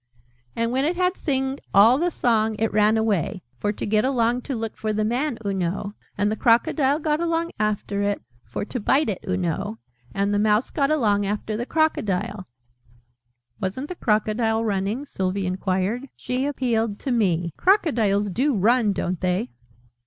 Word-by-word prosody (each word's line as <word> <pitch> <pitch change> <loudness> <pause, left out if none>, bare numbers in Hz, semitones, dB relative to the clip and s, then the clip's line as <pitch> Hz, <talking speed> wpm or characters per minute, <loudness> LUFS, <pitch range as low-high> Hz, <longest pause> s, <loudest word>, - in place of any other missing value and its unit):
"And 230 0 0
when 260 +2 +1
it 330 +5 +1
had 365 +1 +1
singed 270 -2 -1
all 225 +7 +7
the 350 +2 +2
Song, 225 -7 +1
it 220 -1 0
ran 215 +1 +4
away 205 -4 0 0.2
for 205 - 0
to - - -5
get 215 0 +2
along 245 -2 +1
to 270 - -1
look 225 -1 -4
for 215 - -2
the 215 0 0
Man, 245 +3 -1
oo 200 - 0
know. 195 +2 -2 0.2
And 205 +1 +1
the - - 0
Crocodile 265 +5 +3
got 305 -1 0
along 335 0 0
after 205 -1 -1
it 205 0 0 0.2
for 115 - -5
to 250 - -4
bite 270 +5 +2
it, 195 - -4
oo 185 - +1
know. 165 -11 -2 0.3
And 200 +1 0
the 205 - +2
Mouse 215 +2 +2
got 280 -2 +1
along 210 -9 +2
after 210 +1 -2
the 240 +3 -3
Crocodile." 210 - 0 1.1
"Wasn't 230 +10 -3
the 360 - -5
Crocodile 220 -1 +1
running?" 205 +6 -1
Sylvie 190 -5 -2
enquired. 190 +7 -1
She 255 +2 -2
appealed 230 -6 0
to 270 - -2
me. 175 -8 +1
"Crocodiles 225 - +2
do 265 +7 +1
run, 215 +1 +3
don't 180 -2 -3
they?" 185 +6 0
220 Hz, 175 wpm, -23 LUFS, 200-265 Hz, 1.1 s, all